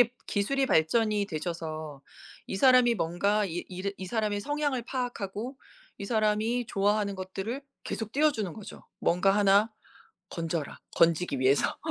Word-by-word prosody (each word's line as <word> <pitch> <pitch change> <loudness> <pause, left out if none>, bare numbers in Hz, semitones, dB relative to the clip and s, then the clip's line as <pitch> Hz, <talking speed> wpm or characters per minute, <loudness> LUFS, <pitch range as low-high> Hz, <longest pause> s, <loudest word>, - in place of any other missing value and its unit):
기술이 240 +1 -5
기술이 265 +7 0
발전이 210 +4 +2
되셔서 155 -4 -5 0.4
이 190 - -4
사람이 250 +1 +6
뭔가 200 +3 +1
이 175 -2 -4
이를 190 +2 -4
이 190 - -6
사람의 215 -1 -1
성향을 290 0 -1
파악하고 245 -1 -4 0.4
이 200 - -5
사람이 220 +2 +1
좋아하는 205 0 +1
것들을 195 +8 -5 0.2
계속 220 -1 -4
띄어주는 265 - +1
거죠. 215 +2 -10 0.2
'뭔가 180 +3 +3
하나 205 +2 +4 0.6
건져라.' 165 -2 -3 0.2
건지기 165 -3 +3
위해서. 135 +2 +3
205 Hz, 325 characters per minute, -28 LUFS, 180-235 Hz, 0.6 s, 사람이